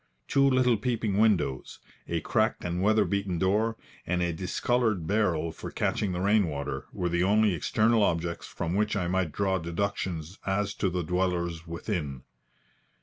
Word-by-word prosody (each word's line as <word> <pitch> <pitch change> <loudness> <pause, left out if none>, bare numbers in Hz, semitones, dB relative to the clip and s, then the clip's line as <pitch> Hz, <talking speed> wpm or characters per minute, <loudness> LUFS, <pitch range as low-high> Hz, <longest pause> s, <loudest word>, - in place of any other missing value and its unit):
Two 140 0 +4
little 125 -3 +3
peeping 110 -3 -1
windows, 95 - +1 0.3
a 85 -1 -1
cracked - - 0
and 90 +1 -2
weather 110 +1 +4
beaten 100 -3 -1
door, 105 +5 +1 0.3
and 90 0 +1
a 85 -1 0
discoloured 105 +2 0
barrel 85 -5 +1
for - - -8
catching 100 - -1
the 90 0 -2
rain 100 0 +3
water, 70 -2 -4
were 90 -4 -2
the 85 +1 +1
only 105 +1 +3
external 110 +7 +2
objects 85 -3 0
from 80 - -3
which 105 +2 +1
I 90 -4 0
might 90 -2 0
draw 95 0 0
deductions 85 0 -3
as 100 +1 -1
to 95 - 0
the 90 0 -2
dwellers 85 -1 -1
within. 80 - -4
95 Hz, 160 wpm, -28 LUFS, 85-105 Hz, 0.3 s, Two